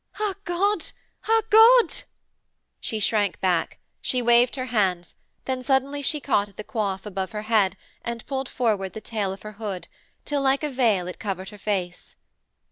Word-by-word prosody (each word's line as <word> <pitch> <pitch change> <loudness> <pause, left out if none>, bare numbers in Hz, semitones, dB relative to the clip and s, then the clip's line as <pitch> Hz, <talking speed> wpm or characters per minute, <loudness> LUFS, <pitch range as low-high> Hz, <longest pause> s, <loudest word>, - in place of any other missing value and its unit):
Ah 420 -2 0
God! 370 +1 +1 0.4
ah 450 0 +4
God!' 460 +3 +7 0.9
She 220 - -3
shrank 205 -2 +1
back; 180 -3 0 0.2
she 255 - 0
waved 240 +1 +4
her 255 -2 -3
hands, 185 -5 +1 0.3
then 260 -1 -2
suddenly 275 +2 +1
she 300 +2 +1
caught 205 -8 +1
at 200 - -23
the 215 - -5
coif 200 -3 -2
above 195 0 -4
her 210 0 -4
head 210 -4 +2 0.3
and 235 -1 -5
pulled 270 -1 -3
forward 210 -6 0
the - - -6
tail 210 -4 -2
of 195 - -9
her 215 - -7
hood 195 -4 -4 0.4
till, 290 -1 -1
like 275 +2 +2
a 300 - -1
veil, 225 -9 +2
it 180 - -7
covered 190 -2 -4
her 210 -1 -13
face. 185 -4 -3
220 Hz, 175 wpm, -25 LUFS, 195-270 Hz, 0.9 s, God